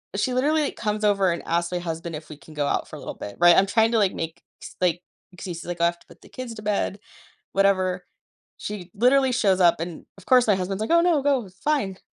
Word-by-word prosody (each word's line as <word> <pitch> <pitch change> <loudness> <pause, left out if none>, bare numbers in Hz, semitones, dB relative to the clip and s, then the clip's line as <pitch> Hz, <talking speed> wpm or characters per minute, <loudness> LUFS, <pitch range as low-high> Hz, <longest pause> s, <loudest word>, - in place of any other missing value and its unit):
she 255 - 0
literally 295 +3 +1
comes 215 -1 -3
over 200 -3 +3
and 170 - -3
asks 170 +1 0
my 180 - -1
husband 165 -1 -5
if 155 +1 -9
we 150 - -9
can 155 +2 -15
go 145 -1 -1
out - - -1
for - - -10
a - - -9
little - - -7
bit. 100 - -8
Right? 175 0 +7
I'm 195 - +5
trying 225 +3 +2
to, 230 - +3
like, 200 -3 +2
make 165 +1 -5 0.2
s - - -10
like 175 -1 +1 0.3
excuses, 175 -2 -7
like, 175 0 -4
"Oh, 170 - +5
I - - +6
have 170 0 -3
to - - -25
put - - -18
the - - -17
kids 255 -2 -7
to 215 - -9
bed," 205 -1 -1 0.5
whatever, 185 -2 +1 0.5
she 200 -4 -7
literally 260 +4 +3
shows 195 -6 +2
up 170 -2 +4
and, 165 0 -6
of 195 - -16
course, 250 -2 +5
my 205 - +4
husband's, 190 +2 -3
like, 220 - -2
"Oh, 335 - +6
no, 340 -4 +2
go, 265 -8 +1
fine 280 -11 0
g - - -23
195 Hz, 255 wpm, -24 LUFS, 175-230 Hz, 0.5 s, Right